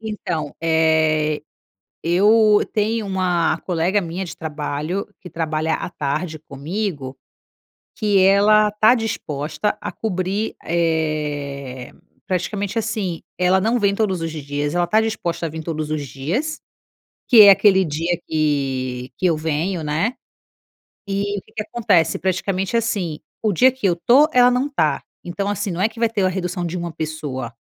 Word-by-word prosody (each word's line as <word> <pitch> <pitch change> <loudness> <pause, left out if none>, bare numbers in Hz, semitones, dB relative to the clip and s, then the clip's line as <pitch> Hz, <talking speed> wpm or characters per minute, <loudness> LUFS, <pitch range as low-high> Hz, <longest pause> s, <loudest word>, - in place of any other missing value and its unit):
Então, 180 -9 -4
eh, 160 -2 +2 0.6
eu 210 +4 +4
tenho 215 0 0
uma 180 -4 +1
colega 180 +3 0
minha 175 +1 -4
de 175 -1 -8
trabalho, 155 +3 -3
que 180 - -11
trabalha 160 -1 -1
à - - -4
tarde 155 +1 -3
comigo, 150 -1 -5 0.8
que 205 -2 +2
ela 210 +2 +5
tá 215 +3 +5
disposta 210 - -2
a - - -5
cobrir, 195 +1 -2
eh, 150 -6 -2 0.3
praticamente 195 +3 -2
assim, 210 -6 -2 0.2
ela 180 +1 +3
não 225 +5 +1
vem 200 -3 +2
todos 195 -4 0
os 165 -1 -3
dias, 145 0 -3
ela 175 0 +2
está 215 +6 +3
disposta 175 -7 -2
a - - -3
vir 160 +1 -7
todos 155 -1 -4
os 150 -2 -2
dias, 195 - -3 0.7
que 230 -4 +9
é 200 - +10
aquele 190 -1 +5
dia 165 +3 -1
que 135 -5 -1
que 185 - 0
eu 165 - +2
venho, 160 +3 -2
né. 160 - -1 0.9
E, 200 +1 -1
o - - -5
que 215 - -25
que 220 - -3
acontece, 205 -8 +1
praticamente 190 +3 -1
assim, 200 -9 -2 0.2
o 215 - +1
dia 255 +8 +5
que 260 -4 -6
eu 185 - +4
estou, 250 - +4
ela 245 0 +6
não 250 +3 0
tá. 280 - 0 0.2
Então 195 +3 -3
assim, 205 -1 -2
não 175 - -3
é 205 - +4
que 225 - -13
vai 230 -1 +2
ter 210 -4 -1
a 185 - +4
redução 180 -1 -3
de 175 +2 -3
uma 170 0 -4
pessoa. 150 -6 -5
175 Hz, 160 wpm, -21 LUFS, 155-205 Hz, 0.9 s, é